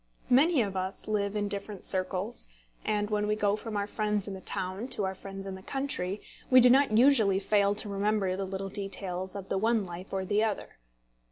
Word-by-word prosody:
Many 280 +1 +5
of 195 -2 -4
us 190 +1 -4
live 205 -1 0
in 205 -1 0
different 200 -1 -4
circles; 185 - -1 0.4
and 210 0 -1
when 210 0 +1
we 210 - +1
go 205 -1 +2
from 215 0 -5
our 200 - 0
friends 210 -1 -1
in 200 - -4
the 190 - -8
town 185 +7 -2
to 210 -6 +2
our 190 - -2
friends 195 0 -8
in 195 - -5
the 190 - -8
country, 215 -6 -3 0.3
we 255 - +8
do 250 0 +7
not 265 -4 +4
usually 230 -7 +5
fail 200 0 +2
to 210 - -4
remember 200 -1 0
the 195 +1 -3
little 195 +1 -4
details 190 -2 -3
of 195 -1 -7
the 195 - 0
one 225 -1 +2
life 175 +1 -8
or 190 -1 -2
the 205 +3 +2
other. 215 - -3
200 Hz, 210 wpm, -29 LUFS, 190-215 Hz, 0.4 s, we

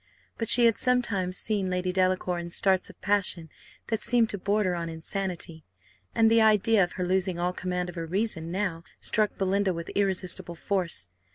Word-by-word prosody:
But 225 - -2
she 240 0 +8
had 230 -1 +3
sometimes 205 -8 0
seen 205 -4 -1
Lady 180 0 -1
Delacour 185 -1 0
in 170 0 -6
starts 190 +2 +2
of - - -15
passion 185 -5 0 0.4
that 225 -1 -1
seemed 235 -1 +4
to 200 - -5
border 200 -1 0
on 170 -1 -4
insanity, 165 -1 -4 0.5
and 225 - +4
the 230 0 +5
idea 215 -1 +4
of 175 - -3
her 180 - -3
losing 185 0 +1
all 175 +1 -1
command 180 0 -3
of 175 - -7
her 165 -1 -5
reason 180 -3 -2
now 180 -3 -2 0.2
struck 215 -2 0
Belinda 195 -1 0
with 170 0 -6
irresistible 185 -3 -1
force. 175 - -2
185 Hz, 180 wpm, -27 LUFS, 175-205 Hz, 0.5 s, she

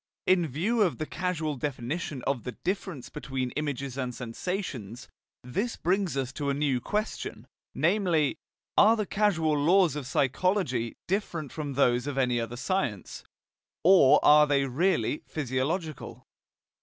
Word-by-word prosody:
In 180 -3 +3
view 190 - 0
of 185 -6 +2
the 155 - -3
causal 160 -4 -2
definition 140 +1 -4
of 135 -4 0
the 125 - -6
difference 185 -8 -4
between 130 -2 -4
images 140 -3 -3
and 125 -2 -3
sensations, 125 - -5 0.4
this 200 - -2
brings 185 -3 0
us 135 -1 -2
to 145 -2 -2
a 140 - 0
new 140 -4 0
question, 210 - -3 0.3
namely: 170 -4 +2 0.4
Are 220 +2 +6
the 215 - -1
causal 190 -7 +1
laws 170 +3 +4
of 145 -4 -5
psychology 135 - 0
different 170 -7 -2
from 145 -3 -4
those 125 -1 +2
of 140 -2 -3
any 125 -2 +2
other 115 +1 -4
science, 130 - -2 0.6
or 175 -6 +7
are 150 0 +7
they 140 -1 +2
really 155 +4 0
physiological? 150 +4 -3
150 Hz, 140 wpm, -28 LUFS, 130-180 Hz, 0.6 s, or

